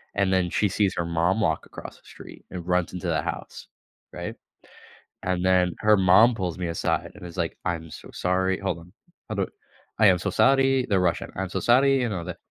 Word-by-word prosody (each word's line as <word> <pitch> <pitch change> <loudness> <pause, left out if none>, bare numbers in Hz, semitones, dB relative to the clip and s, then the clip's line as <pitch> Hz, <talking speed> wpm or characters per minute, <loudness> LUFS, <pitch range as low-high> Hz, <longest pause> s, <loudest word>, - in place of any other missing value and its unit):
and 100 -2 +1
then 90 -2 +2
she 105 - +1
sees 100 0 +1
her 85 - 0
mom 85 +5 +1
walk - - 0
across - - -10
the - - -27
street - - -13
and 90 -1 -7
runs 90 -1 +1
into 90 - -5
the - - +1
house. - - -6 0.4
Right? - - -6 0.9
And 90 0 -1
then 90 -1 +3
her 110 -1 +4
mom 95 +6 +6
pulls 90 -5 -3
me 90 -1 -3
aside 85 - -2
and - - -11
is 85 +1 -10
like, 85 -2 -2
"I'm 85 -2 -3
so - - -11
sorry" 95 +1 0
Hold 95 -4 -2
on. 85 +2 -16 0.4
Hold - - -2
o - - -1 0.5
"I 110 - +7
am 90 -2 +5
so 95 +3 -3
sorry."- 135 +4 +3
They're 100 -2 +3
Russian.- 90 -2 -1
"I'm 95 0 -3
so 95 - -2
sorry." 135 +6 +4
You 120 - 0
know 95 -5 -4
that 90 -1 -6
95 Hz, 215 wpm, -25 LUFS, 90-105 Hz, 0.9 s, I